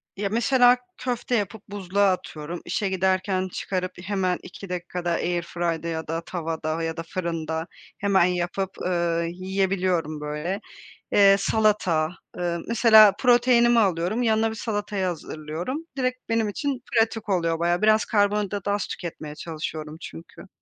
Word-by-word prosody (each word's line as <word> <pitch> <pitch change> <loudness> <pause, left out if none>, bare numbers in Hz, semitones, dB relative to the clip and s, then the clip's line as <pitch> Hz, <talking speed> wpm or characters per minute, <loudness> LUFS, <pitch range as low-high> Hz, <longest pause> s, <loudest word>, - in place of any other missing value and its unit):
Ya, 200 0 -2
mesela 245 +3 +4 0.2
köfte 245 0 -2
yapıp 205 -1 -2
buzluğa 200 0 +1
atıyorum. 165 -1 -5
İşe 205 -3 -1
giderken 190 0 +1
çıkarıp 185 0 -3
hemen 185 -2 0
2 195 +1 -10
dakikada 180 0 -3
airfry'da 170 -1 -1
ya 160 -1 -3
da 165 +1 -2
tavada 165 -2 -3
ya 165 0 -3
da 165 - -3
fırında 165 -2 -3 0.3
hemen 195 -3 +3
yapıp, 180 +1 -1
ııı, 170 -2 0
yiyebiliyorum, 185 -3 -1
böyle. 150 +6 -3 0.5
Eee, 195 -1 +7
salata, 195 -7 +2 0.3
eee, 175 -1 -1
mesela 220 -3 +7
proteinimi 240 -1 +5
alıyorum, 190 +2 +1
yanına 225 -1 +2
bir - - -5
salatayı 205 -3 -2
hazırlıyorum, 170 - -4
direkt 255 -1 -2
benim 225 -2 +1
için 265 +3 -3
pratik 225 -1 +1
oluyor 170 -4 +1
bayağı. 175 +2 +1
Biraz 215 0 +4
karbonhidratı 205 -1 0
az 200 -2 0
tüketmeye 160 -4 -6
çalışıyorum 155 -1 -6
çünkü. 80 0 -10
185 Hz, 135 wpm, -25 LUFS, 170-210 Hz, 0.5 s, Eee